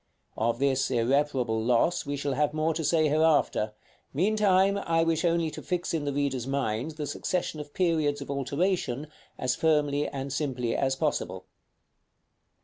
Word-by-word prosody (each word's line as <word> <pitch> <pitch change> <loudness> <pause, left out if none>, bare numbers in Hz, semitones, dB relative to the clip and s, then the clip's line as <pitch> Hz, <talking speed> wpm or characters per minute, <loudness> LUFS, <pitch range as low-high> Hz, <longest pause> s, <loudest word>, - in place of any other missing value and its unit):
Of 115 +2 0
this 135 0 +1
irreparable 125 -2 +1
loss 125 +7 +2
we 145 - -1
shall 140 0 -2
have 150 +2 0
more 155 +1 +1
to 160 - -3
say 155 +1 +3
hereafter; 150 -8 +2 0.4
meantime, 200 +2 +3
I 165 -3 +1
wish 165 0 +1
only 170 -2 +1
to - - -8
fix 180 -1 -2
in 155 -3 -1
the 145 - 0
reader's 135 -3 -1
mind 135 +2 -2
the 150 - -3
succession 170 +1 -2
of 145 -1 -9
periods 160 -5 +1
of 140 0 -6
alteration 140 0 -1 0.3
as 125 -1 0
firmly 150 -2 +2
and 135 0 -5
simply 130 -5 -1
as 135 -1 +1
possible. - - -2
145 Hz, 155 wpm, -28 LUFS, 135-165 Hz, 0.4 s, say